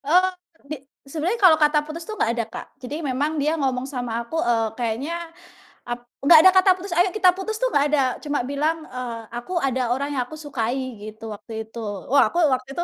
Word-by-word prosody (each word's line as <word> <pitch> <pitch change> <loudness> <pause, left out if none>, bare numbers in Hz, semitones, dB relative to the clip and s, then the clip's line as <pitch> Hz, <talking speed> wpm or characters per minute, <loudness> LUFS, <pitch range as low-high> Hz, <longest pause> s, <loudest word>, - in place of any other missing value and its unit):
Eee, 360 +6 +4 0.4
di 305 - -2 0.3
sebenarnya 340 +10 -1
kalau 330 -4 +8
kata 300 0 +4
putus 325 +2 -7
tuh 435 - -4
gak 230 - +2
ada 235 -1 -1
Kak, - - -6 0.2
jadi 255 +3 -6
memang 285 +4 -1
dia 300 +2 +1
ngomong 260 -2 0
sama 245 -4 -4
aku, 275 +8 -6
eee, 225 -2 +2
kayaknya 240 +6 -2 0.8
ap 240 - -2 0.2
nggak 315 +3 +9
ada 375 +2 +8
kata 375 +1 +6
putus, 370 -1 -5
"Ayo 355 +2 +4
kita 385 -2 +4
putus" 430 +3 -4
tuh - - +3
gak 285 - +4
ada, 295 - +3 0.2
cuma 290 -1 -1
bilang, 305 +3 +1
eee, 250 -2 -5 0.2
"Aku 240 +10 -6
ada 260 -3 0
orang 280 +3 -2
yang 255 - +1
aku 310 - -10
sukai," 265 -5 -2 0.2
gitu 215 +1 -10
waktu 225 +3 -12
itu. 225 +1 -9 0.3
Wah 280 - +6
aku 345 - 0
waktu 255 +1 -3
itu 345 - +1
285 Hz, 210 wpm, -23 LUFS, 245-330 Hz, 0.8 s, nggak